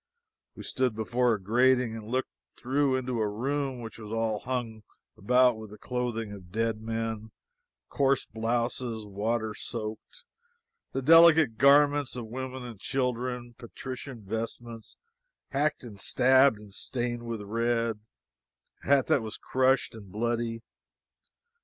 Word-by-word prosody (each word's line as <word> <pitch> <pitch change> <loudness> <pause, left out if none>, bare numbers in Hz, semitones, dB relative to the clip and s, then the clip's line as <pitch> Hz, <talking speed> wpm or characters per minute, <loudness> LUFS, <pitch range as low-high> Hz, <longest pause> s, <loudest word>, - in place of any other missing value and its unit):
We - - -9
stood 130 -4 0
before 120 +2 +1
a - - -6
grating 125 +3 +3
and 110 -1 -8
looked 130 +3 -1 0.3
through 135 +1 +1
into 130 -2 -2
a 105 - +1
room 135 +3 -2
which 115 -1 -8
was 110 0 -2
hung 120 -3 -2
all 110 - -17 0.3
about 125 +2 +3
with 110 -1 -9
the 105 - -11
clothing 120 -4 -3
of 95 -3 -11
dead 110 +1 -1
men; 110 -1 -3 0.6
coarse 135 -2 +1
blouses, 115 0 -2
water 110 +2 -2
soaked; 110 - -6 0.7
the 135 - -3
delicate 160 -5 +7
garments 145 0 +5
of 120 -2 -5
women 130 +2 -6
and 120 -5 -9
children; 125 -1 -2
patrician 125 0 -8
vestments, 115 +2 -5 0.5
hacked 145 +1 0
and 105 -5 -10
stabbed 130 +1 +4
and 105 -1 -14
stained 120 +1 -3
with 115 -2 -5
red; 115 +1 0 0.8
a - - -11
hat 140 -1 +4
that 135 - +3
was 110 -1 -6
crushed 130 -1 +1
and 100 -4 -12
bloody. 115 +1 -2
120 Hz, 135 wpm, -28 LUFS, 110-130 Hz, 0.8 s, delicate